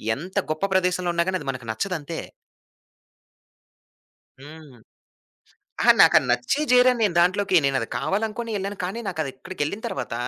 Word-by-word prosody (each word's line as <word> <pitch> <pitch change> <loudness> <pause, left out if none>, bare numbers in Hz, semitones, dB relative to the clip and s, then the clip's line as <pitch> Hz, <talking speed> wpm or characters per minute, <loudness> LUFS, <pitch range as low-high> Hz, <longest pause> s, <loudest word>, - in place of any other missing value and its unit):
ఎంత 180 +8 -10 0.2
గొప్ప 155 +5 -1
ప్రదేశంలో 180 -1 +1
ఉన్నా 170 0 +2
గానీ 185 -1 -1
అది 140 - -6
మనకు 130 -3 -9
నచ్చదంతే. 165 - -4 2.2
హ్మ్. 150 0 -13 1.1
ఆహా! - - +7
నాకు - - +6
అది - - +1
నచ్చే 125 - 0
జేర 250 0 +6
నేను 210 -5 +1
దాంట్లోకి 185 +3 +2
నేను 135 -1 +1
అది 115 - -4
కావాలనుకోనే 215 - -2
ఎళ్ళాను. 200 +1 -5
కానీ 190 +6 -4
నాకదక్కడికెళ్ళిన 155 +3 -4
తరువాత, - - -5
180 Hz, 135 wpm, -23 LUFS, 145-200 Hz, 2.2 s, ఆహా